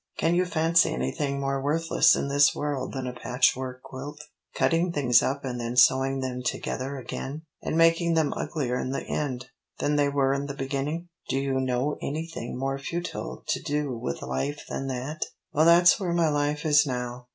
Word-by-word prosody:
Can 165 - +2
you 180 +1 +3
fancy 165 -1 +3
anything 140 - -2
more 135 0 -1
worthless 160 +4 +3
in - - -2
this 140 0 +4
world 140 -3 -2
than 130 -2 -3
a 125 - -4
patchwork 125 +1 0
quilt? 140 +3 -8 0.4
cutting 170 +2 +2
things 125 -6 +4
up 140 +1 -2
and 125 -2 -3
then 120 +1 -4
sewing 130 +1 +4
them 125 -1 -3
together 130 +2 -3
again, 135 +4 -6 0.2
and 160 - -2
making 165 0 +4
them 155 -3 +2
uglier 125 -6 -2
in - - -3
the 135 - -3
end 130 -3 -3 0.3
than 150 0 0
they 145 -1 +3
were 135 -1 +2
in 140 +1 -2
the 140 - -5
beginning? 140 +5 -3 0.2
Do - - 0
you 135 -1 0
know 130 +3 0
anything 155 -5 -4
more 135 +1 -2
futile 135 - -5
to - - 0
do 145 -3 -2
with 70 -11 -4
life 135 - -3
than 135 - -4
that? 135 +4 -4 0.3
Well 155 +2 +4
that's 175 +4 +6
where 180 -4 -1
my 170 -2 +3
life 145 0 -1
is 150 -1 +6
now. 125 -1 -4
140 Hz, 185 wpm, -26 LUFS, 130-150 Hz, 0.4 s, that's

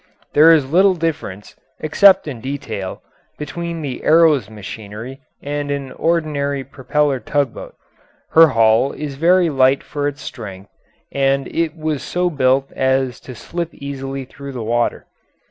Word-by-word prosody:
There 155 +3 +7
is 155 -4 +4
little 185 +6 +4
difference, 155 - -4 0.2
except 190 +4 +5
in 125 -6 -6
detail, 110 -8 -5 0.3
between 165 +2 -5
the 135 -3 -5
Arrow's 155 -9 +4
machinery 110 +5 -9 0.2
and 145 0 -3
an 140 -2 -3
ordinary 145 -4 -1
propeller 135 +1 -1
tugboat. 140 +1 -3 0.6
Her 165 0 +8
hull 115 0 +3
is 150 -2 -5
very 170 +4 +3
light 135 0 +3
for 145 -1 -3
its 145 0 -5
strength, 100 -3 -9 0.4
and 135 0 +1
it 165 -1 -2
was 155 -3 -2
so 180 0 -1
built 135 -2 +1
as 130 -2 0
to 130 - -10
slip 170 +8 -5
easily 135 -1 -6
through 140 +1 -10
the 120 -3 -5
water. 120 +2 -1
140 Hz, 140 wpm, -19 LUFS, 130-155 Hz, 0.6 s, Her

